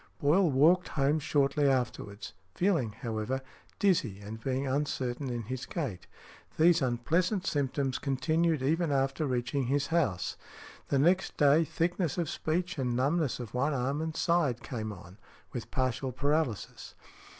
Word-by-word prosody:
Boyle 165 +5 +4
walked 160 +7 +4
home 145 +2 +1
shortly 145 0 +2
afterwards, 120 -6 -2 0.2
feeling, 170 - +1
however, 115 +3 -3 0.4
dizzy, 150 - +1
and 105 +2 -8
being 135 +2 -1
uncertain 135 -1 -2
in 120 -1 -3
his 130 +3 -5
gait; 135 - -4 0.5
these 170 +1 +5
unpleasant 165 - 0
symptoms 135 -3 -1
continued 155 +2 +1
even 160 +3 +1
after 135 +2 0
reaching 125 +1 -1
his 140 +2 +1
house. 110 - 0 0.5
The 140 - +1
next 175 +7 +2
day, 145 +2 +5
thickness 170 +1 -1
of 170 -4 -1
speech 175 +1 -2
and 125 -2 0
numbness 140 +2 +1
of 120 -4 -7
one 140 +4 +1
arm 135 +4 -1
and 160 -1 -3
side 160 -9 +1
came 110 -4 -4
on, 90 0 -12 0.3
with 120 - -5
partial 130 -1 -1
paralysis. 140 -3 -2
140 Hz, 140 wpm, -30 LUFS, 125-160 Hz, 0.5 s, these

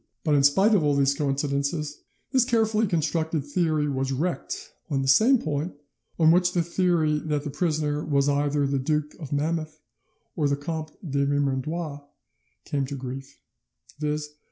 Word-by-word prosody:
But 155 - +2
in 145 - +5
spite 190 +10 +5
of 195 -6 +4
all 145 -1 +2
these 140 0 +3
coincidences, 140 +1 -1 0.3
this 260 -3 +4
carefully 225 -3 +2
constructed 160 -3 0
theory 155 0 +1
was 135 -1 -1
wrecked 165 +7 -3 0.2
on 135 -3 0
the - - -2
same 225 - +6
point 155 -2 -3 0.4
on 160 -1 +6
which 180 +1 +3
the 175 - +2
theory 170 -3 +1
that 150 -2 -2
the 145 - -4
prisoner 150 -2 -1
was 140 -2 +1
either 145 0 +1
the 140 0 0
Duke 150 +2 -1
of 150 -5 -8
Monmouth 155 +1 -2 0.6
or 150 -3 +1
the 140 0 0
Comte 155 +1 -5
de 140 -1 0
Vermandois 145 +2 -1 0.7
came 140 -2 -1
to 140 - -5
grief, 135 +1 -7 0.6
viz. 150 0 -2
150 Hz, 160 wpm, -26 LUFS, 140-165 Hz, 0.7 s, same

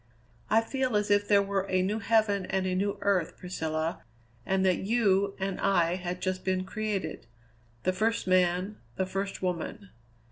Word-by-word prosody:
"I 220 +1 +5
feel 255 0 -1
as 210 0 +1
if 205 0 +3
there 200 -1 +5
were 195 -1 -1
a 185 0 +2
new 210 +4 -1
heaven 210 -3 +2
and 190 -1 0
a 185 - 0
new 200 +2 0
earth, 190 -5 +1
Priscilla, 160 -2 -3 0.5
and 190 0 +2
that 185 -2 +3
you 200 -2 +2
and 195 -1 -3
I 175 -4 +3
had 180 0 -5
just 185 -1 -1
been 185 -1 0
created 195 - -3 0.6
the 185 - +1
first 225 +4 0
man, 185 +2 +2 0.2
the 190 - 0
first 195 +1 -4
woman. 180 +2 -3
190 Hz, 170 wpm, -29 LUFS, 185-205 Hz, 0.6 s, I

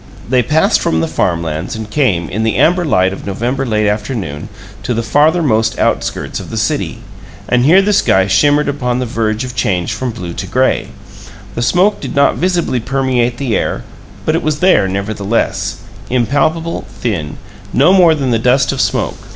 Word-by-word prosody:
They 125 +1 +3
passed 150 +7 +2
from 80 - +1
the 80 - 0
farm 85 +1 -1
lands, 80 +4 -4
and 110 -1 -6
came, 105 - 0
in 105 +7 -3
the 110 0 0
amber 180 +2 +3
light 95 - +2
of - - -8
November 125 +7 -2
late 105 -2 +1
afternoon, 105 - -3 0.3
to 125 - -2
the 115 - -1
farthermost 135 -3 +2
outskirts - - -1
of - - -9
the - - -5
city; - - -2 0.5
and 125 0 +2
here 185 +6 +6
the 210 +1 +1
sky 95 - +3
shimmered 145 +10 +3
upon 125 -4 -1
the 125 - -1
verge 110 0 -1
of 125 -1 -7
change 90 -8 -1
from 130 - -3
blue 90 -7 -6
to - - -5
gray; - - +1 0.7
the - - -3
smoke 180 - +2
did - - -5
not 140 0 +3
visibly 175 -7 0
permeate 125 -1 0
the 125 -5 -1
air, - - -2 0.4
but 155 - +1
it 165 - 0
was 155 -1 -1
there, 180 - +4
nevertheless 100 +3 -2 0.3
impalpable, 145 +7 0 0.2
thin, 80 -11 -3 0.3
no 145 +8 +4
more 175 -4 +5
than 135 -4 -1
the 115 - +2
dust 125 +3 +2
of - - -1
smoke. - - -2
120 Hz, 185 wpm, -15 LUFS, 105-145 Hz, 0.7 s, here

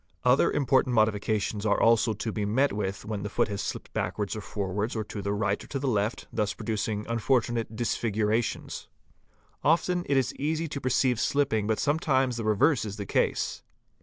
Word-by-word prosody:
Other 125 +2 +4
important 130 -3 +2
modifications 110 -1 +1
are 110 -2 +2
also 115 -1 +4
to 110 +2 -4
be 105 -1 -2
met 125 +7 +2
with 100 -1 -3
when 105 -2 -3
the 105 - -4
foot - - +1
has 100 -1 -3
slipped - - -5
back - - -2
wards 105 -1 -2
or 110 - -4
forwards 100 +3 -3
or 110 - -1
to 105 0 -6
the 100 +1 -2
right 100 0 0
or - - -13
to 140 - -3
the 135 0 -2
left, 105 -1 0
thus 105 -2 0
producing 105 -1 -2
unfortu 115 +1 +1
nate 115 -1 -3
disfigurations. 110 -1 -1 0.4
| - - -37
Often 175 +3 +2
it 140 - +3
is 130 - +1
easy 160 +3 -1
to 140 - -5
perceive 125 -1 +2
slipping 135 -8 +1
but 110 -1 +1
sometimes 135 -5 +1
the 115 - -3
reverse 120 +6 +3
is 105 -2 -5
the 100 - -4
case. - - 0
110 Hz, 195 wpm, -28 LUFS, 105-130 Hz, 0.4 s, Other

